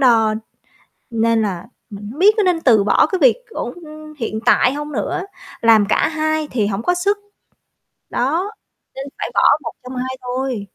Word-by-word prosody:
đo, 225 -4 +4 0.8
nên 230 -1 +1
là 195 -1 -3 0.2
mình 205 0 -8
hông 295 - -10
biết 415 +3 +6
có 420 - +3
nên 360 -3 +2
từ 220 -8 +4
bỏ 210 - +4
cái 375 - 0
việc - - +5
ổn, - - -5
ưm, 310 -2 -12
hiện 220 -1 -3
tại 250 +1 +4
hông 295 +1 -5
nữa, 265 - -2 0.4
làm 225 -3 +5
cả - - +2
hai 310 -1 -1
thì 215 -5 0
hổng 200 +1 -2
có 355 - +2
sức, 400 +3 +1 0.9
đó, 330 - -1 0.4
nên 270 +1 -5
phải - - -3
bỏ - - +3 0.2
một 230 - -4
trong 255 +1 -8
hai 260 +1 -4
thôi. 250 -4 -3
260 Hz, 185 wpm, -19 LUFS, 225-315 Hz, 0.9 s, biết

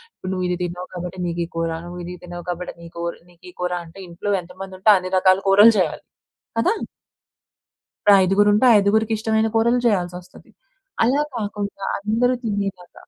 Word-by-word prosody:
ఇప్పుడు 185 - -6
నువ్వు 185 -1 -2
ఇది 180 0 -1
తినవూ 175 +1 -5
కాబట్టి 180 +1 -6
నీకు 170 0 -2
ఈ - - -13
కూర, 165 0 -1 0.2
నువ్వు 175 0 -8
ఇది 180 - -6
తిన్నావు 175 0 -8
కాబట్టి 180 +1 -4
నీ 170 - -10
కోర్ 170 0 -4
నీకు 175 -1 -24
ఈ - - -32
కూర, 180 0 -1
అంటే 165 +4 -14
ఇంట్లో 175 +4 -4
ఎంత 180 +1 -14
మంది 190 -1 -7
ఉంటే 215 +3 +5
అన్ని 185 0 -5
రకాల 185 +1 +4
కూరలు 205 +4 +8
చేయాలి. 170 -5 -1 0.6
కదా! 370 - +3 1.5
ఐదుగురు 195 +3 +3
ఉంటే 215 +5 +3
ఐదుగురికి 220 +2 +2
ఇష్టమైన 220 0 +1
కూరలు 235 +2 +3
చేయాల్సోస్తది. 180 0 -3 0.5
అలా 270 +5 +3
కాకుండా 205 -3 -4
అందరూ 230 +5 +1
తినేలాగ 200 -4 -3
185 Hz, 170 wpm, -21 LUFS, 175-210 Hz, 1.5 s, కూరలు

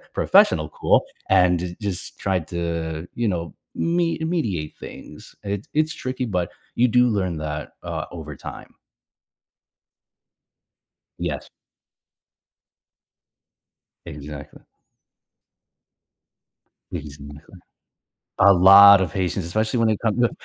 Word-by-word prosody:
professional - - +3
cool - - +2 0.3
and 90 -2 +4
ju 90 0 -5
just 100 -4 -5
tried 95 -5 -1
to, 85 -1 -4
you 120 -1 -1
know, 85 -5 -3 0.2
me 170 0 0
mediate 120 - -2
things. - - -11
It's 100 +1 -4
it's 155 +1 +1
tricky, 130 0 -4
but 90 -6 -2 0.2
you 125 +1 +3
do 125 +2 +4
learn 95 -6 -1
that, 75 -1 -5
uh, - - -4
over 75 -3 -8
time. - - -10 2.4
Yes. - - -4 2.6
Exactly. 75 -1 -10 2.3
But - - -4
he's 75 -2 -10
in 70 - -10
the 75 - -10
clear. 90 - -17 0.8
A 100 0 +7
lot 100 +2 +8
of 90 -3 -2
patience, 95 -1 -2
especially 110 +7 -1
when 115 -1 +3
it 110 - 0
comes 115 +1 0
to 120 - +3
95 Hz, 115 wpm, -22 LUFS, 85-110 Hz, 2.6 s, lot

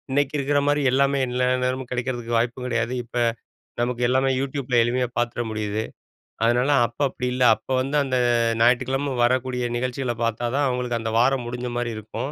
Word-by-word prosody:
இன்னைக்கு 145 +2 0
இருக்கற 145 +1 +1
மாரி 145 0 +2
எல்லாமே 140 +1 +2
எல்லா 125 +1 0 0.2
நேரமும் 130 0 -2
கிடைக்கிறதுக்கு 120 -1 -2
வாய்ப்பு 120 +2 -1
கெடையாது. 120 -1 -1
இப்ப, 120 +1 -8 0.6
நமக்கு 120 0 -1
எல்லாமே 130 +1 +2
YouTubeல 135 -3 0
எளிமையா 125 +2 0
பாத்துட 120 0 -1
முடியுது. 105 0 -2 0.6
அதனால 120 +4 +2 0.2
அப்ப 115 - -21
அப்படி 125 -1 -4
இல்ல, 125 0 +1
அப்ப - - -25
வந்து 135 +3 -2
அந்த 130 -2 -2 0.2
அ 115 -1 +2
ஞாயிற்றுக்கிழம 130 +3 +2
வரக்கூடிய 125 0 0
நிகழ்ச்சிகள 125 0 -2
பாத்தா 115 +1 -1
தான், 145 0 +2
அவங்களுக்கு 125 -2 -1
அந்த 110 0 -3
வாரம் 125 0 +2
முடிஞ்ச 125 +1 -4
மாரி 120 -1 -2
இருக்கும். 110 +5 -5
125 Hz, 170 wpm, -23 LUFS, 120-130 Hz, 0.6 s, மாரி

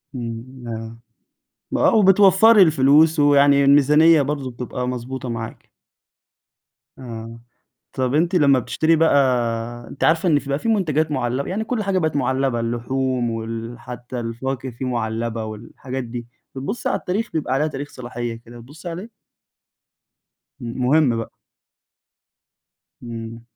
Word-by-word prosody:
إمم 120 +1 -7
آه، 115 0 -6 0.8
آه، - - +3
وبتوفّري 200 +1 +6
الفلوس 155 0 +4
ويعني 140 -1 +5
الميزانية 150 +3 +5
برضه 140 -2 -3
بتبقى 125 +1 -5
مضبوطة 125 +1 -5
معاكِ. 115 -1 -6 1.3
آه، 115 -2 -8 0.5
طَب 130 0 -1
أنتِ 170 +5 +1
لمّا 140 -6 +4
بتشتري 160 +7 +1
بقى 160 -1 +3 0.7
أنتِ - - -5
عارفة 165 +3 +3
إن 150 -3 +4
فيه 140 - -10
بقى 140 - 0
فيه 230 - -4
منتجات 160 -7 +1
معلّبة 130 0 -2
يعني 210 +4 -2
كل 225 -1 -2
حاجة 195 -2 0
بقت 155 -4 -1
معلبة، 130 -2 0
اللحوم 120 +1 -1
وال 115 +1 -5
حتى 125 +1 -7
الفواكه 130 +3 -4
فيه 120 +2 -7
معلّبة 115 -1 -2
والحاجات 120 +4 -7
دي، 120 0 -7 0.3
بتبُصّي 140 - -3
على - - 0
التاريخ؟ 210 +5 -3
بيبقى 145 -5 -1
عليها 150 +3 +1
تاريخ 145 -1 -5
صلاحية 120 -1 -6
كده، 120 +1 -12
بتبُصّي 145 +8 -11
عليه؟ 180 +7 -7 1.5
امم، 120 0 -6
مهم 140 -4 +3
بقى. 115 - -4 1.7
إمم. 115 -1 -7
130 Hz, 130 wpm, -21 LUFS, 120-155 Hz, 1.7 s, وبتوفّري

